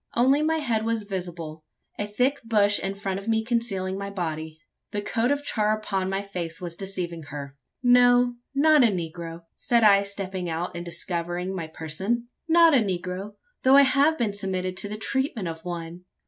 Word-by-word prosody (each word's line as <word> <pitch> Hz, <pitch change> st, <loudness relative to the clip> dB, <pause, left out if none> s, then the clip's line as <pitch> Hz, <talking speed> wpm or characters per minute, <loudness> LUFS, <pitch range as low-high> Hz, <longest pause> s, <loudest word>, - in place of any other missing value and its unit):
Only 265 Hz, +5 st, +4 dB
my 320 Hz, +1 st, +2 dB
head 235 Hz, -8 st, 0 dB
was 225 Hz, -1 st, -1 dB
visible 175 Hz, -5 st, -6 dB, 0.4 s
a 205 Hz, -, -1 dB
thick 255 Hz, +7 st, 0 dB
bush 205 Hz, -3 st, +3 dB
in 195 Hz, 0 st, -3 dB
front 195 Hz, -1 st, -3 dB
of 200 Hz, -, -11 dB
me 220 Hz, -1 st, +2 dB
concealing 200 Hz, -6 st, -1 dB
my 200 Hz, 0 st, -4 dB
body. 160 Hz, -4 st, -4 dB, 0.3 s
The 205 Hz, -1 st, -3 dB
coat 225 Hz, +3 st, 0 dB
of 285 Hz, 0 st, 0 dB
char 215 Hz, -5 st, +1 dB
upon 195 Hz, -3 st, -2 dB
my 195 Hz, +1 st, -1 dB
face 175 Hz, -4 st, -5 dB
was 175 Hz, -2 st, -6 dB
deceiving 180 Hz, -3 st, -4 dB
her. 140 Hz, -1 st, -7 dB, 0.3 s
"No, 245 Hz, 0 st, +5 dB, 0.2 s
not 300 Hz, 0 st, +6 dB
a -, -, +7 dB
negro," 170 Hz, -3 st, -4 dB
said 235 Hz, -1 st, +2 dB
I, 200 Hz, -2 st, +7 dB
stepping 190 Hz, -3 st, -4 dB
out 170 Hz, +2 st, -3 dB
and 170 Hz, -, -4 dB
discovering 175 Hz, +1 st, -3 dB
my 165 Hz, -3 st, -4 dB
person 190 Hz, +10 st, -3 dB, 0.2 s
"not 335 Hz, -1 st, +6 dB
a -, -, +7 dB
negro, 190 Hz, -1 st, -2 dB, 0.3 s
though 260 Hz, +1 st, +6 dB
I 280 Hz, -, +9 dB
have 280 Hz, +4 st, +3 dB
been 225 Hz, -5 st, 0 dB
submitted 185 Hz, -2 st, -3 dB
to 205 Hz, -, -1 dB
the 210 Hz, -, -5 dB
treatment 250 Hz, -3 st, -2 dB
of 160 Hz, -1 st, -6 dB
one." 175 Hz, 0 st, -6 dB
200 Hz, 185 wpm, -25 LUFS, 175-235 Hz, 0.4 s, I